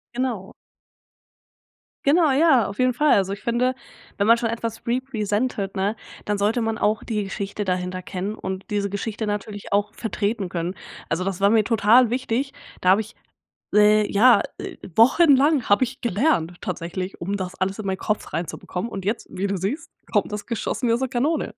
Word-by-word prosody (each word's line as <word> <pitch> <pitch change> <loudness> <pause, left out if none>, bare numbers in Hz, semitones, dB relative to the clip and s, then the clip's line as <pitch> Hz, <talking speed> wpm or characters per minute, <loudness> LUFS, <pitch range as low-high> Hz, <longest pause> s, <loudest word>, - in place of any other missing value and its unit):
Genau. 240 -7 -3 1.5
Genau, 310 +2 +4
ja, 270 -6 +4
auf 200 - -7
jeden 255 -1 +2
Fall. 295 +4 +3
Also, 195 -1 +2
ich 200 - -8
finde, 245 +2 +1 0.4
wenn 200 - +1
man 230 +1 +7
schon 235 -1 -1
etwas 230 -1 -5
represented, 225 -4 -1
ne? 200 +3 0 0.3
Dann 210 0 0
sollte 215 +4 +1
man 225 0 -1
auch 215 -1 +1
die 210 -3 -2
Geschichte 200 +1 -4
dahinter 185 0 -2
kennen 200 +2 -4
und 190 -2 -5
diese 200 -1 -1
Geschichte 215 +2 -3
natürlich 205 -1 -4
auch 205 +1 +1
vertreten 210 -2 -2
können. 175 +2 -3 0.3
Also, 175 +3 0
das 195 0 -3
war 200 - +5
mir 220 0 +4
total 225 +2 +4
wichtig, 255 +2 -1 0.3
da 180 - +2
habe 195 +4 +5
ich 220 +2 -11 0.6
le 210 0 +5
ja, 225 +2 +6 0.2
äh, - - -7 0.2
wochenlang 280 +2 +5
habe 205 +5 +5
ich 260 +2 -4
gelernt 210 - +1
tatsächlich, 185 +2 -5
um 200 +4 -2
das 185 -1 -5
alles 190 +2 -2
in 200 - -4
meinen 190 - -1
Kopf 210 +3 -3
reinzubekommen 180 +5 -4
und 195 -1 -5
jetzt, 215 +4 -2
wie 190 +2 -2
du 195 -1 -1
siehst, 230 - -3 0.2
kommt - - +1
das 210 -1 -5
geschossen 235 +2 -2
wie - - +4
aus 235 - +1
der 265 -1 -1
Kanone. 275 0 0
210 Hz, 185 wpm, -23 LUFS, 195-240 Hz, 1.5 s, man